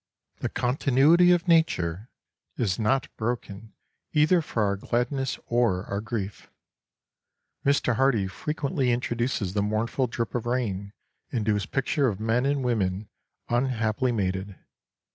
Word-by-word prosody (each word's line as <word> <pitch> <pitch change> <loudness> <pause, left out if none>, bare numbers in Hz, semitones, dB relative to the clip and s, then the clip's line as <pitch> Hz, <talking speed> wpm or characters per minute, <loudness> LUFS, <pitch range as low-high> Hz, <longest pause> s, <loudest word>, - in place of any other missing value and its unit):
The - - -2
continuity 140 +7 +4
of 175 0 +2
nature 110 - +2 0.5
is 100 -5 0
not 125 +4 +1
broken 110 -2 -4 0.4
either 155 +4 +4
for 115 -7 -1
our 100 -1 +1
gladness 125 +6 -1
or 115 -6 +1
our 100 +1 -3
grief. 105 -3 -5 1.1
Mr 140 -4 +2
Hardy 125 -6 +3
frequently 140 - -2
introduces 120 -4 -1
the 100 - +1
mournful 110 +5 0
drip 115 -3 -3
of 120 -1 -2
rain 100 -6 -2 0.4
into 110 -3 0
his 105 -2 -2
picture 140 +1 +1
of 105 -5 -2
men 115 +4 +1
and 140 -1 0
women 100 -4 -1 0.4
unhappily 120 -1 0
mated. 95 -2 -2
120 Hz, 125 wpm, -26 LUFS, 105-135 Hz, 1.1 s, continuity